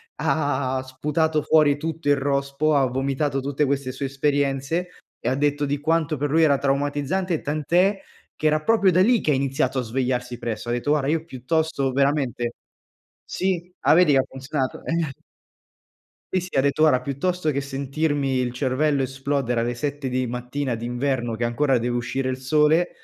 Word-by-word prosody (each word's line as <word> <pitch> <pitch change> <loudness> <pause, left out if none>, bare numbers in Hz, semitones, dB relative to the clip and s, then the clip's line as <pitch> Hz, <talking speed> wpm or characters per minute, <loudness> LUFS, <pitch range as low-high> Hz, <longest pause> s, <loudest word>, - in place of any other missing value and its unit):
ha 140 -4 0
ha - - -2
sputato 150 +4 0
fuori 150 -2 +4
tutto 160 0 -5
il 145 - +6
rospo, 140 +2 0
ha 135 -2 +4
vomitato 135 +2 -1
tutte 140 +2 0
queste 140 -1 -1
sue 135 +2 -4
esperienze 140 +4 0 0.3
e - - -1
ha 130 - +1
detto 145 0 +1
di 140 0 -1
quanto 160 -1 0
per 145 +1 -2
lui 165 +1 +4
era 140 -3 +4
traumatizzante, 145 +5 -1
tant'è 175 +7 +1 0.4
che 155 - 0
era 155 0 +2
proprio 205 -3 +4
da 180 +2 +4
lì 235 +2 +4
che - - -1
ha - - +4
iniziato 135 0 0
a - - +1
svegliarsi 125 0 -2
presto. 115 0 -4
Ha - - 0
detto: 120 +4 -2
"Guarda, 145 -2 +1
io 160 0 0
piuttosto 140 -1 -1
veramente" 135 -4 0 0.8
sì, 180 -1 -1
ah, - - +7
vedi 175 -4 +5
che 135 - +5
funzionato? 135 0 -4
Eh. 165 -3 -1 1.2
Sì, 185 - +2
sì, 185 - -9
ha - - +5
detto, 140 +2 +1
guarda: 140 -5 +5
"Piuttosto 155 +5 -1
che 140 -1 -1
sentirmi 140 0 -1
il 125 -1 -1
cervello 135 +2 +1
esplodere 135 -2 -1
alle 120 +1 -1
7 145 +1 -3
di 125 0 -1
mattina 125 +1 -3
d'inverno 120 0 -2
che 115 - -5
ancora 130 +3 +2
deve 120 +1 -1
uscire 130 +2 -2
il 130 - -2
sole, 150 +5 +3
140 Hz, 175 wpm, -23 LUFS, 130-155 Hz, 1.2 s, ah